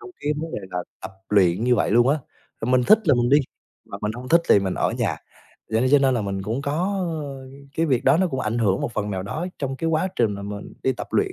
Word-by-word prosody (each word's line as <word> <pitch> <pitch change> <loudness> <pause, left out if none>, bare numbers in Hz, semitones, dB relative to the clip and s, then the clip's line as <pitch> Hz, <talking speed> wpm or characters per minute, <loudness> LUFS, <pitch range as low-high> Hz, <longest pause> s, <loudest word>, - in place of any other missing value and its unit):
trong 395 -3 -11
cái 150 - 0
vấn 165 0 -6
đề - - -2
là 90 - -3 0.2
tập 95 0 -7 0.2
luyện 95 0 +3
như 125 0 +4
vậy - - +1
luôn 120 +4 +4
á. 150 - +2 0.4
Mình 125 +2 +3
thích 215 - +4
là 145 - +6
mình 120 0 +1
đi 145 - +7 0.5
mà - - -8
mình 105 +1 -1
hông 125 +2 -8
thích 170 +4 +5
thì - - +7
mình 95 -2 -2
ở - - 0
nhà. - - -1 0.5
Vậy 115 +4 +2
cho 145 - +8
nên 135 -1 +3
là 120 - 0
mình 95 -1 -3
cũng 115 +7 -3
có, 140 - -2 0.5
ờ, 140 -1 -7 0.4
cái 165 0 +2
việc 130 -5 +1
đó - - +5
nó 185 +2 +2
cũng 130 -5 -3
ảnh 110 +2 -1
hưởng 100 -4 +1
một - - -3
phần 105 -1 -2
nào 95 -1 -3
đó 155 - -4
trong 135 -2 -3
cái 165 - -2
quá 165 +4 +1
trình 115 -3 +2
mà 100 - -7
mình 100 0 -7
đi 130 - +2
tập 125 - -7
luyện. 390 -2 +1
125 Hz, 275 wpm, -23 LUFS, 105-145 Hz, 0.5 s, cho